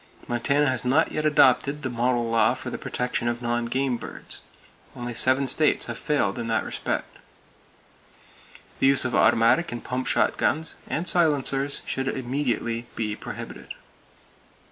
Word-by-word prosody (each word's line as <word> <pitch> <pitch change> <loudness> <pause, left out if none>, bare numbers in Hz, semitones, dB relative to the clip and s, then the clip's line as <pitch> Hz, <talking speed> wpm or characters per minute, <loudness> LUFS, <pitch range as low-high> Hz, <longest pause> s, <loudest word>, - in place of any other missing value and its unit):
Montana 140 +5 +1
has 130 0 -1
not 135 +6 +2
yet 155 0 0
adopted 140 0 +3
the 130 - -1
model 120 0 0
law 115 +1 +3
for 130 - -7
the - - -5
protection 125 -1 -2
of 120 0 -1
non 120 0 -1
game 130 0 0
birds. - - -7 0.5
Only 120 0 -5
seven 130 +4 +3
states 150 +4 +3
have - - -5
failed 135 -8 0
in 115 - -3
that 110 -1 +1
respect. - - -4 1.6
The - - +4
use 135 -1 +4
of 125 - -2
automatic 115 +10 +4
and 120 - -6
pump 125 0 -3
shotguns, 160 +2 +1
and 170 +3 -2
silencers, 140 -4 +1
should 135 0 -3
immediately 120 -3 -2
be 105 -2 -2
prohibited. - - -8
130 Hz, 145 wpm, -25 LUFS, 120-140 Hz, 1.6 s, The